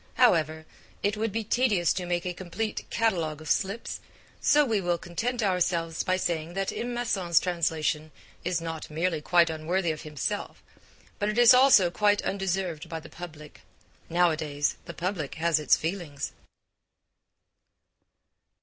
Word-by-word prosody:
However, 160 -9 +3 0.4
it 205 +1 +1
would 220 0 -1
be 225 +2 -2
tedious 210 -6 +2
to 180 -2 -4
make 175 0 -1
a 180 - -2
complete 190 +5 -4
'catalogue 170 -9 0
of 155 - -10
slips,' 200 +4 -1 0.4
so 295 0 +4
we 220 -5 +1
will 175 -1 0
content 230 +8 -3
ourselves 175 -4 0
by 185 -1 +1
saying 170 -1 -2
that 195 0 -1
M. 240 +1 -3
Masson's 190 -8 +2
translation 155 -3 -1 0.3
is 175 -1 0
not 165 -1 -6
merely 160 +1 -1
quite 170 +1 +4
unworthy 165 +3 -1
of 155 - -6
himself, 150 -4 -4 0.6
but 210 +2 -1
is 240 +1 +8
also 250 -9 +6
quite 205 +2 +2
undeserved 185 -4 -2
by 165 -1 -4
the - - -13
public. 155 -4 -10 0.5
Nowadays, 155 -4 +1
the - - -8
public 175 -5 -3
has 165 0 +2
its 150 - +4
feelings. 160 -4 -4
175 Hz, 140 wpm, -27 LUFS, 160-200 Hz, 0.6 s, is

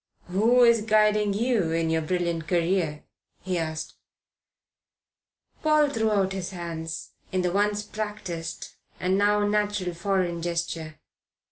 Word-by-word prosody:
"Who 225 +7 +4
is 235 -2 +5
guiding 210 -1 +3
you 225 -6 +1
in 165 0 0
your 160 0 +1
brilliant 170 -1 -1
career?" 170 -2 0 0.4
he 185 -2 -1
asked. 160 -1 -4 1.6
Paul 305 -1 +4
threw 225 -3 +1
out 195 -2 +1
his 190 -2 -4
hands, 165 -3 -6 0.2
in 185 -1 0
the 180 - +1
once 205 +2 +1
practised 210 -6 -5 0.3
and 185 +1 +1
now 205 +1 +3
natural 205 -3 0
foreign 175 -1 -1
gesture. 165 -2 -3
190 Hz, 125 wpm, -26 LUFS, 170-210 Hz, 1.6 s, is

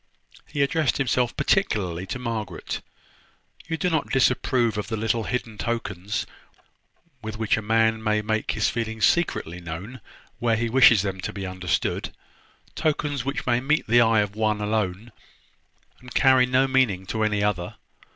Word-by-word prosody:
He 145 -2 0
addressed 145 -1 +1
himself 125 -2 0
particularly 95 - 0
to 100 - -4
Margaret. 115 -4 -4 0.9
"You 165 - -2
do 180 - 0
not 160 -4 0
disapprove 125 -3 +2
of 105 -2 -3
the 110 0 -3
little 110 +1 0
hidden 115 -4 -4
tokens 105 -4 -3 1.0
with 110 -1 -6
which 110 -1 +1
a 110 - -3
man 110 +1 +2
may 105 -1 +1
make 110 +1 -1
his 105 - +1
feelings 110 -1 -1
secretly 90 - 0
known 90 +9 -7 0.4
where 115 -1 +2
he 115 +1 -1
wishes 115 -4 +6
them 95 -2 -3
to - - -4
be 100 -2 -6
understood; 95 -2 -2 0.6
tokens 145 -4 -1
which 140 +1 -3
may 120 -1 +2
meet 150 +5 +1
the 120 +2 +5
eye 115 -2 +4
of 100 0 -3
one 110 -1 0
alone, 105 0 -2 0.9
and 125 0 -13
carry 130 -2 +5
no 130 +1 +3
meaning 125 -8 +1
to 110 +3 -3
any 105 -1 +1
other! 95 -4 -1
110 Hz, 160 wpm, -24 LUFS, 105-125 Hz, 1.0 s, wishes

